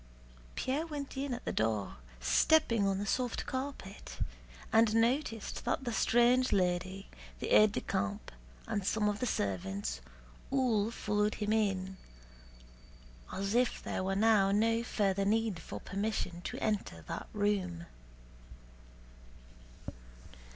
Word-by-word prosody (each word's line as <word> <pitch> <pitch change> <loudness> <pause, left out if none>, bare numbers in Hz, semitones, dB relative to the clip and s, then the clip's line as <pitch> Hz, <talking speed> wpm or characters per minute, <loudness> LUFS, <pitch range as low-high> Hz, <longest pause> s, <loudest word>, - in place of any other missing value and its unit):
Pierre 285 +6 -1
went 290 -3 -5
in 275 0 -2
at 245 0 -4
the - - -1
door, 110 - -1 0.2
stepping 205 - +3
on 195 -1 +1
the 200 - -2
soft 245 +4 -1
carpet, 260 -7 -6 0.6
and 225 -1 +5
noticed 230 -1 0
that - - -1
the 240 -2 -2
strange 245 +3 +4
lady, 185 +1 0 0.3
the - - -3
aide 210 -1 +6
de - - -1
camp, 200 +2 -2 0.3
and 215 -3 -2
some 210 +2 +1
of 210 0 0
the 250 - -1
servants, 95 - -2 0.5
all 240 -6 +2
followed 210 -2 0
him 210 0 -1
in, 190 -3 0 1.3
as 195 +2 -2
if 245 0 +1
there - - -2
were 195 +1 0
now 205 -2 +4
no 225 +3 +3
further 200 -4 +1
need 215 -2 +1
for - - -7
permission 195 -3 -3
to - - -5
enter 200 - -2
that - - -5
room. 195 -5 -1
210 Hz, 130 wpm, -32 LUFS, 190-230 Hz, 1.3 s, aide